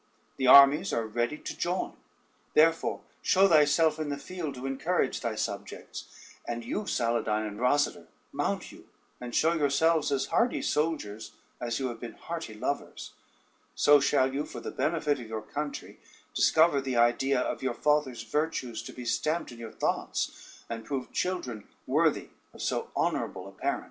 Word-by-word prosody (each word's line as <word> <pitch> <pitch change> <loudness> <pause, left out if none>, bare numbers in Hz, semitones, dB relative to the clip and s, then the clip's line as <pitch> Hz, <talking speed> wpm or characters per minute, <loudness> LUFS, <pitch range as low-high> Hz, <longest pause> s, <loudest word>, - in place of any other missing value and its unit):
The 130 - 0
armies 140 +7 +8
are 115 - 0
ready 120 +6 -1
to - - -7
join; 180 +2 -2 0.6
therefore 165 +1 +3 0.2
show 195 +1 +5
thyself 155 -1 +4
in 155 -2 -2
the 145 - -2
field 155 -1 -5
to 125 +1 -7
encourage 135 +2 0
thy 115 -3 -2
subjects; - - -5 0.4
and 120 -1 -4
you, 205 - -3
Saladyne 115 -2 0
and 105 0 -8
Rosader, 145 +4 +1 0.2
mount - - -2
you, - - -15 0.3
and 120 -1 -6
show 165 +2 +3
yourselves 155 0 +2
as 135 -1 +1
hardy 240 +1 +2
soldiers 145 -9 -2 0.3
as 120 -1 -2
you 130 -1 -1
have 115 -1 -7
been 120 -1 -7
hearty 165 -10 -6
lovers; 140 +6 -4 0.6
so 145 0 +6
shall 135 -1 +2
you, 145 +2 -1
for - - -8
the - - -6
benefit 150 -3 0
of 120 - -8
your 110 -1 -5
country, 145 +6 -6 0.3
discover 160 -3 +4
the 130 -2 -2
idea 125 +3 +3
of - - -2
your 130 -2 -1
father's 150 -5 +1
virtues 125 -2 -2
to - - -9
be 125 - -8
stamped 155 +7 -1
in 120 - -11
your 115 -2 -7
thoughts, - - -3
and 115 -1 -5
prove 130 0 -4
children 125 - -3 0.2
worthy - - +1 0.3
of - - -9
so - - -1
honorable - - -1
a - - -10
parent." - - -2
140 Hz, 165 wpm, -29 LUFS, 120-155 Hz, 0.6 s, armies